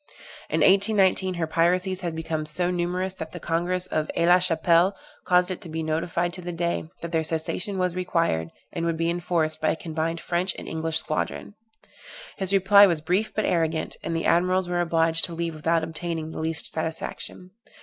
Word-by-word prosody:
In - - 0
1819, 195 -2 +4
her 170 -1 -1
piracies 180 +4 +1
had 170 -3 -3
become 160 -1 -3
so 175 +4 0
numerous 180 +1 -1
that 160 -4 -8
the - - -6
Congress 175 +2 -1
of 155 -4 -2
Aix 170 - +2
la 180 +1 +7
Chapelle 175 +2 +3 0.3
caused 180 0 +3
it 185 - -5
to 175 - -7
be 160 0 -3
notified 170 +2 -1
to 180 - -6
the 175 0 -5
Dey, 170 -1 -2
that 170 - -4
their 165 -1 +1
cessation 165 +5 -1
was 180 -1 0
required, 165 - 0 0.2
and 170 - -3
would 165 -1 -1
be 165 +1 +1
enforced, 170 -3 -1
by 155 - +2
a - - +1
combined 165 0 -3
French 175 +2 0
and - - -8
English 160 0 -1
squadron. 155 +5 -2 0.8
His 190 -1 -2
reply 200 +1 +7
was 170 -4 +1
brief 180 +7 0
and 215 - 0
arrogant, 160 -2 0
and 165 - -3
the 165 - -2
admirals 180 +2 +2
were 175 0 0
obliged 165 -1 +2
to 170 - -7
leave 165 0 -2
without 165 +1 0
obtaining 160 0 -4
the - - -6
least 160 0 -1
satisfaction. 160 +3 -4
170 Hz, 190 wpm, -25 LUFS, 160-180 Hz, 0.8 s, la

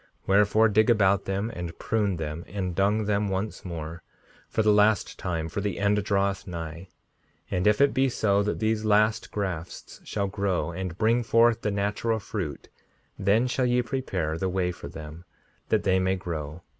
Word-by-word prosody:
5:64 - - -35
Wherefore, 105 +3 +4
dig 110 +2 +3
about 100 -3 +3
them, 100 +4 -2
and 85 -1 -6
prune 105 -4 0
them, 80 +1 -4
and 95 -1 -3
dung 105 +4 +1
them 105 0 0
once 95 +3 -3
more, 85 -2 -6 0.5
for 110 - +1
the 105 0 +5
last 105 0 +2
time, 85 -3 -2
for 100 +5 -4
the 100 0 -2
end 100 0 +2
draweth 100 -1 0
nigh. 85 0 -6 0.6
And 90 +2 +1
if 105 0 +4
it 140 0 +4
be 135 0 +2
so 100 -4 +2
that 105 +1 -1
these 110 0 0
last 110 0 +2
grafts 90 -5 -5
shall 100 -2 -2
grow, 95 -2 -1
and 90 0 -5
bring 115 +3 +3
forth 115 0 +3
the 105 - 0
natural 105 +3 0
fruit, 95 -8 -5 0.5
then 100 +5 +3
shall 125 0 0
ye 125 0 +2
prepare 95 - -2
the 95 - 0
way 90 -1 0
for 85 - -9
them, 80 +3 -9 0.5
that - - +2
they 95 -1 +3
may 95 0 +1
grow. 85 -3 -6
100 Hz, 180 wpm, -26 LUFS, 90-110 Hz, 0.6 s, the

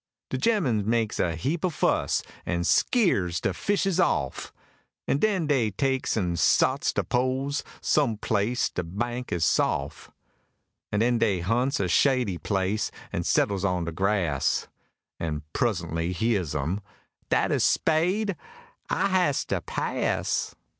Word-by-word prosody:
De 130 - -1
gemmen 140 - +2
makes 110 0 0
a 85 -3 +1
heap 145 - -2
o'fuss, 180 -5 +1 0.2
an 85 -1 -1
skeers 95 - +2
de - - -1
fishes 195 -3 0
off, 70 - 0 0.6
An' 140 - +1
den 195 -4 +1
dey 135 -7 +2
takes 130 +4 -1
an' 90 -4 0
sots - - +3
de - - -1
poles, 130 +3 -1 0.2
some 135 -8 +2
place 110 +3 0
de - - -2
bank 120 +8 -4
is 85 -2 +1
sof, - - 0 0.8
An' 105 - +1
den 120 0 +2
dey 100 -6 +1
hunts 120 +9 0
a 95 - +1
shady 120 -2 +2
place, 100 +1 -1 0.2
an' - - -1
settles 100 -2 +1
on 90 -3 0
de 85 - -3
grass, 90 -6 0 0.5
An' 75 -2 -3
pruz'ntly 85 -6 -1
heahs 95 -8 0
'em: 85 +9 -2 0.5
"Dat - - +2
a - - +2
spade? 180 +6 +2 0.5
I - - +1
has 180 -7 +2
to - - -2
pass!" - - -1
110 Hz, 140 wpm, -26 LUFS, 90-140 Hz, 0.8 s, sots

